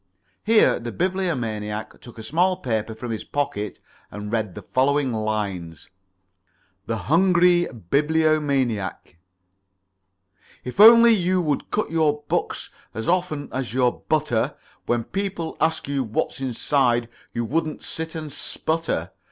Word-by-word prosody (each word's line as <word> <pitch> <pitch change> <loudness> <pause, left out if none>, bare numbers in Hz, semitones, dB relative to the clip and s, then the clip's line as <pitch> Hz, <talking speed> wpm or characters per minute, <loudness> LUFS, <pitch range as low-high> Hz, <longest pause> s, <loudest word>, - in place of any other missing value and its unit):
Here 225 0 +4
the 120 0 -5
Bibliomaniac 115 - -2
took 120 - -13
a 110 - -8
small 175 +10 +1
paper 110 -8 -2
from 115 +1 -6
his 110 - -4
pocket 105 -8 -3 0.3
and 105 0 -7
read 110 -5 -1
the - - -8
following 135 0 +1
lines: 100 -7 -3 1.0
"THE 115 - -1
HUNGRY 175 - +4 0.2
BIBLIOMANIAC 140 - +1 1.4
"If 125 +9 -7
only 230 +2 +9
you 185 -2 +1
would 150 -3 -1
cut 215 - -1
your 150 -2 +1
books - - -2 0.2
As 110 - -4
often 170 -5 0
as 130 -2 -3
your 125 -2 +1
butter, 150 -7 +1 0.3
When 120 -1 +1
people 195 - -4
ask 160 -3 +1
you 140 -1 0
what's 110 +3 -2
inside 125 -2 +1 0.2
You 120 0 -2
wouldn't 155 +5 -2
sit 160 0 -4
and 155 -3 -5
sputter. 155 - -2
140 Hz, 125 wpm, -23 LUFS, 110-165 Hz, 1.4 s, only